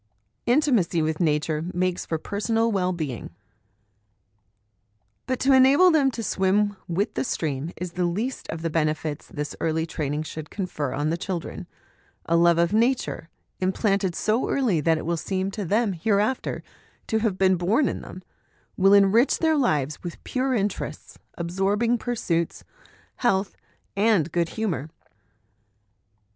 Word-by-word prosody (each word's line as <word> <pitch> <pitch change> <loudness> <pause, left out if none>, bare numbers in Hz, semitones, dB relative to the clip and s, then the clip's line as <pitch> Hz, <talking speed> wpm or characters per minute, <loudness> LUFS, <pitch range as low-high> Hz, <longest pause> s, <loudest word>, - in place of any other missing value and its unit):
Intimacy 240 - +3
with 155 0 -1
Nature 150 -1 0
makes 180 0 -1
for 160 - -1
Personal 225 +6 0
Well 185 -3 +1
being. 150 -9 -4 2.0
But 255 -1 -1
to 270 +1 +4
enable 275 +8 +6
them 290 -4 +4
to 230 -3 -5
swim 205 +1 +1
with 185 +4 -1
the - - -1
stream 155 - -2
is 180 -1 -5
the 180 +1 -1
least 220 +10 -3
of 160 0 -5
the 165 - -1
benefits 155 -1 -1
this 150 -4 -5
early 160 0 0
training 150 -2 -3
should 155 -1 -7
confer 180 -8 -3
on 150 +2 -1
the 165 - -1
children; 175 -1 -5 0.6
a 170 - +1
love 170 0 +5
of 170 +3 +2
Nature, 230 -7 0 0.3
im 185 0 +1
planted 195 -3 0
so 220 +3 0
early 225 - +1
that 160 +2 +2
it - - -5
will 170 +1 0
seem 190 +3 -2
to 205 0 -4
them 210 +3 +1
hereafter 210 +7 0 0.4
to 220 - 0
have 215 -4 0
been 190 -1 +4
born 205 - +2
in - - -3
them, 185 - -10 0.5
will 195 +1 +5
enrich 200 +6 +4
their 320 -1 +2
lives 150 - 0
with 175 -1 -8
pure 260 0 -1
interests, 205 -2 -3 0.2
absorbing 195 +7 0
pursuits, 175 -10 -2 0.5
health, 195 -5 +1 0.4
and 200 -6 +2
good 170 0 0
humour. 170 - -3
190 Hz, 150 wpm, -25 LUFS, 165-225 Hz, 2.0 s, enable